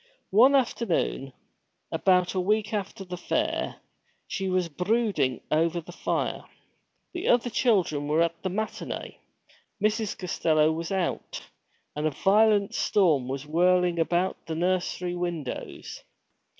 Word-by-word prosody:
One 250 +8 +6
afternoon, 225 - 0 0.6
about 180 -1 +2
a 190 - 0
week 210 +3 0
after 200 -1 -4
the 180 -1 -7
fair, 320 - -1 0.5
she 195 -1 -3
was 185 -1 +1
brooding 185 - 0
over 165 +2 +2
the 170 +1 -10
fire. - - -2 0.7
The 355 0 -4
other 245 0 +3
children 180 - +1
were 155 +3 +3
at 170 0 -3
the 190 - -2
matinée, 215 +4 -4 0.6
Mrs. 215 +1 0
Costello 160 -3 +2
was 165 +2 -4
out, 190 -3 -2 0.5
and 150 +1 0
a 145 - -4
violent 205 0 +4
storm 160 -11 +2
was 135 +2 -4
whirling 175 +2 +2
about 175 +3 0
the 160 - -3
nursery 180 +1 -1
windows. 175 -6 -5
180 Hz, 125 wpm, -27 LUFS, 165-210 Hz, 0.7 s, One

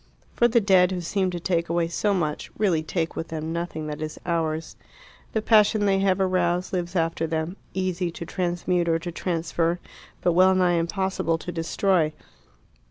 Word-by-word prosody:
For 240 - +4
the 235 0 +4
dead, 190 -3 +4
who 185 - -2
seemed 185 +2 -1
to 175 - -3
take 170 -1 -1
away 170 0 +1
so 205 +5 0
much, 155 -6 -1
really 185 -7 +2
take 160 +1 -2
with 165 - -4
them 160 0 -4
nothing 170 -2 -4
that 150 0 -5
is 155 0 -5
ours. 165 -2 -1 0.6
The 220 - 0
passion 215 -1 +4
they 195 -1 +3
have 195 -1 +2
aroused 180 -1 +1
lives 175 0 -2
after 165 -1 0
them, 160 +2 -2 0.2
easy 185 -1 -1
to 170 0 -7
transmute 175 0 -1
or 165 - +3
to 175 +1 -6
transfer, 170 0 -1 0.4
but 175 - +3
well 185 +2 +5
nigh 180 -2 +3
impossible 170 -1 -1
to 175 - -6
destroy. 165 -1 +1
175 Hz, 175 wpm, -25 LUFS, 165-190 Hz, 0.6 s, well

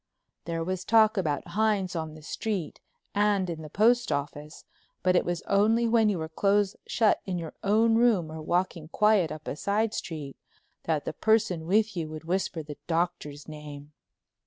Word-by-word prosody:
There 165 -1 -2
was 185 +1 -3
talk 220 +1 +4
about 155 -8 -1
Hines 205 -4 0
on 160 -1 -4
the 155 - -13
street 185 0 -4 0.3
and 205 -2 +2
in 160 -1 -6
the 155 - -9
postoffice, 155 -9 0 0.4
but 185 0 +3
it - - +4
was 175 -1 -3
only 220 +4 +3
when 225 -2 +4
you 200 - 0
were 160 -1 -4
close 200 +4 +1
shut 225 -3 +2
in 185 -2 -2
your 165 -2 -6
own 220 +3 +3
room 225 -9 +3
or 160 0 -7
walking 175 -1 -1
quiet 205 -2 +3
up 155 0 -8
a - - -3
side 210 +7 0
street 150 -4 -6 0.5
that 155 -3 0
the - - -3
person 215 -7 +1
with 210 +2 +2
you 165 -3 -3
would 155 0 -8
whisper 175 -1 -2
the 150 -1 -9
Doctor's 165 -4 -2
name. 150 -1 -10
180 Hz, 175 wpm, -27 LUFS, 155-210 Hz, 0.5 s, talk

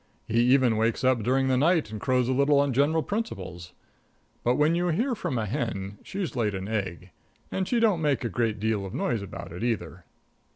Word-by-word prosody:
He 115 +1 +1
even 125 -3 +4
wakes 115 +2 0
up 130 -2 +3
during 130 +4 +1
the 130 -1 +2
night 155 - +2
and 105 -2 -6
crows 125 -2 +1
a 130 - +1
little 140 +2 +4
on 140 -2 +2
general 150 +5 +2
principles. 95 - -5 0.7
But 120 +1 +2
when 150 +3 +3
you 175 +1 +1
hear 230 - +1
from 175 - -3
a 110 - -1
hen, 105 -5 -3
she's 190 -7 -5
laid 105 -5 0
an 95 +1 -4
egg, 95 -4 -4 0.4
and 190 -1 -1
she 240 - +1
don't 210 -7 +3
make 145 -4 +1
a 120 - -1
great 110 0 -1
deal 110 -1 0
of 95 - -6
noise 115 -4 -1
about 100 - -8
it, 85 +6 -6
either. 95 -7 -3
125 Hz, 210 wpm, -27 LUFS, 105-150 Hz, 0.7 s, even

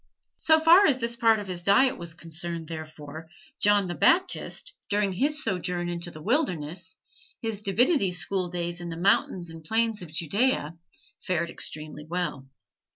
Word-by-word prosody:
So 315 0 +4
far 340 +5 +7
as 275 -4 +3
this 235 -1 -1
part 230 -1 +4
of 205 - -5
his 180 -2 -4
diet 255 +9 +4
was 170 -2 -6
concerned, 170 0 -5
therefore, 155 -1 -8 0.3
John 205 -1 +4
the 175 - -4
Baptist, 375 - +1 0.2
during 205 -1 +1
his 295 +10 0
sojourn 180 -4 -2
in 175 0 -3
the 170 -3 -7
wilderness, 185 - -1 0.4
his 225 -3 -4
divinity 210 - +2
school 180 +1 -2
days 175 0 -4
in 175 - -6
the 165 - -6
mountains 175 -2 +1
and 165 0 -11
plains 225 +4 0
of 170 -3 -9
Judea, 170 - 0 0.5
fared 170 -2 -1
extremely 150 0 -3
well. 165 -6 -3
180 Hz, 155 wpm, -26 LUFS, 170-225 Hz, 0.5 s, far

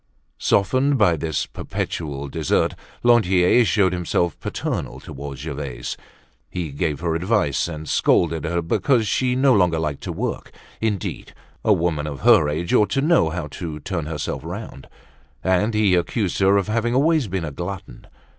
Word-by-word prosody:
Softened 130 +8 +2
by 100 -7 +4
this 80 0 -2
perpetual 70 -4 -4
dessert, - - 0 0.3
Lantier 110 -2 +5
showed 100 -4 +2
himself 85 -2 0
paternal - - -4
towards 70 -1 -8
Gervaise. 70 -5 -5 0.5
He 85 -5 -4
gave 75 0 -2
her 85 -2 0
advice 85 -4 +1
and 80 -2 -7
scolded 85 0 +2
her 85 +1 -1
because 115 - +2
she 125 +2 +1
no 130 0 +4
longer 90 -6 +3
liked 75 -3 -2
to - - -3
work. - - -4 0.3
Indeed! 105 -5 -3 0.3
A 110 - +3
woman 85 -5 +1
of 70 -3 -6
her 75 - +5
age 80 +3 -2
ought 105 - +4
to 135 - +2
know 155 - +3
how 85 -1 -4 0.2
to 80 -3 -4
turn 85 -2 -4
herself 75 -1 -4
round. 90 -4 -8 0.5
And 95 +4 +1
he 105 -3 +3
accused 90 +3 0
her 100 +1 +4
of 100 - 0
having 115 +2 0
always 150 -1 +3
been 95 -3 -2
a 75 - -5
glutton. 85 +6 -7
90 Hz, 160 wpm, -22 LUFS, 80-105 Hz, 0.5 s, Lantier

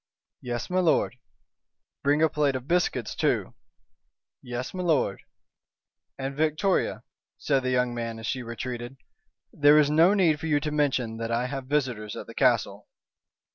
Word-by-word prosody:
"Yes, 120 -1 -4
m'lord!" 180 -7 +1 0.8
"Bring 145 +3 +2
a 160 - +4
plate 145 -3 +1
of 130 +1 -5
biscuits 170 - 0
too." - - 0 0.9
"Yes, 125 +1 -5
m'lord!" 165 - 0 1.0
"And, 135 0 -4
Victoria," 160 +6 0 0.3
said 140 -2 +1
the 130 - -2
young 125 -1 +1
man, 115 -1 -4
as 115 - -8
she 130 - -2
retreated, 120 +2 -6 0.6
"there 145 +1 +6
is 150 -1 +4
no 165 +6 +5
need 165 -7 +3
for 160 - -4
you 150 -2 +2
to 150 +1 -3
mention 130 -6 0
that 115 0 -4
I 120 +1 0
have 135 0 -5
visitors 125 -7 -1
at - - -7
the - - -11
castle." - - +1
135 Hz, 150 wpm, -26 LUFS, 120-150 Hz, 1.0 s, there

